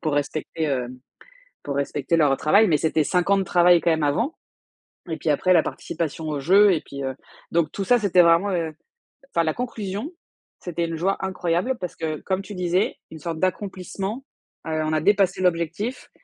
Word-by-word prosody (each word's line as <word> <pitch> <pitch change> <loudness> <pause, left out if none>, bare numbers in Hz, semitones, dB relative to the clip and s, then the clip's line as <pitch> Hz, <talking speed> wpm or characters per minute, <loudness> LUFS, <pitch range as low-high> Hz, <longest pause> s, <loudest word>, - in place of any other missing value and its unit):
pour 155 -3 -1
respecter, 150 +2 -2
heu, 130 -3 -1 0.8
pour 140 - -4
respecter 140 +3 -1
leur 145 -4 +4
travail. 200 +8 +4
Mais 155 -5 +3
c'était 160 0 +1
5 180 +4 0
ans 200 - +5
de 195 - +1
travail 175 -1 +4
quand 170 - +1
même 160 -1 +1
avant 230 - 0 0.7
et 160 -2 -3
puis 155 - -2
après, 185 +5 +3
la 170 - +6
participation 160 -1 -4
aux 150 -2 -2
jeux 195 +8 +5
et 160 - -1
puis 140 0 -8
heu 130 0 -2 0.4
donc 165 -2 +1
tout 195 - -3
ça, 245 +5 +4
c'était 195 -4 +4
vraiment 170 +3 +4
heu 165 -3 -1 0.6
enfin, 170 - +1
la 155 -1 0
conclusion, 220 - -4 0.5
c'était 170 -1 -3
une 165 - -4
joie 185 +5 0
incroyable 185 +5 -1
parce 180 -2 -5
que, 155 -2 -3
comme 190 0 -1
tu 200 +1 -9
disais, 180 +2 0 0.2
une 160 - -9
sorte 165 0 -5
d'accomplissement. 195 +4 -3 0.4
Heu, 155 0 -1
on 155 - -1
a 155 - +1
dépassé 195 -1 +2
l'objectif 180 +6 -1
170 Hz, 190 wpm, -23 LUFS, 155-195 Hz, 0.8 s, la